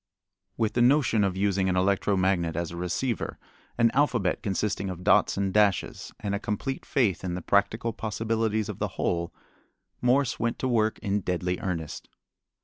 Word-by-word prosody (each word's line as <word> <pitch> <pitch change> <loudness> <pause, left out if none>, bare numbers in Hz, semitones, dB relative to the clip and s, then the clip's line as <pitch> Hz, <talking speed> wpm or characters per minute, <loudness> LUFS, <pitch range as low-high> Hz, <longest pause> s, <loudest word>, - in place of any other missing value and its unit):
With 110 -2 0
the 120 - +1
notion 120 -4 +4
of 95 -2 0
using 95 -1 +1
an 90 - +1
electro 95 +1 +2
magnet 90 -3 +1
as 85 -1 -2
a - - -7
receiver, 90 +8 -2 0.4
an 115 -1 +4
alphabet 125 -9 +1
consisting 100 0 -1
of 90 -1 -6
dots - - +4
and 95 -1 0
dashes, 105 -4 +1
and 100 -1 -3
a 100 - -1
complete 110 +7 -4
faith 115 - +1
in 90 -1 -2
the 90 - -4
practical 110 +3 +1
possibilities 110 0 -1
of 105 - -6
the - - 0
whole, 85 -1 -1 0.7
Morse 125 +1 +2
went 115 +1 -1
to 130 - -2
work 110 -3 +1
in 100 -1 +1
deadly 90 0 -2
earnest. 85 -5 -4
100 Hz, 170 wpm, -27 LUFS, 95-115 Hz, 0.7 s, notion